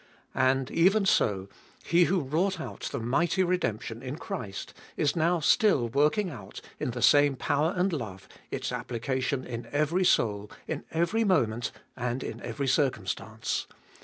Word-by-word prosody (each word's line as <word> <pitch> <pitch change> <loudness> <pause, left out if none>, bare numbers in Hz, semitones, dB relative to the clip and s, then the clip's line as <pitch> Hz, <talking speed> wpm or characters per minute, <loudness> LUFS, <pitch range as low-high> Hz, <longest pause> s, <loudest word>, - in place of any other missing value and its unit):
And, 130 +1 +2
even 195 +5 +4
so, 100 - +2 0.4
He 170 +1 +4
who 185 0 +1
wrought 170 +7 0
out - - -5
the - - -3
mighty 165 +11 +1
redemption 115 - -1
in 130 +1 -5
Christ 140 - -6 0.2
is 145 - +1
now 170 +1 +2
still 155 - +3
working 150 - +2
out, 105 -7 -9 0.2
in - - -1
the 120 0 -3
same 145 -1 +6
power 155 +7 0
and 180 +1 +1
love, 100 -10 -5 0.2
its - - -3
applica 130 +2 -2
tion 130 0 -1
in 120 -1 -6
every 155 +5 +1
soul, 105 - +2 0.2
in - - -3
every 170 +8 +1
moment 120 - +1 0.2
and 125 +1 -2
in - - -6
every 140 -2 -3
circumstance. 110 -5 -1
140 Hz, 155 wpm, -28 LUFS, 120-175 Hz, 0.4 s, same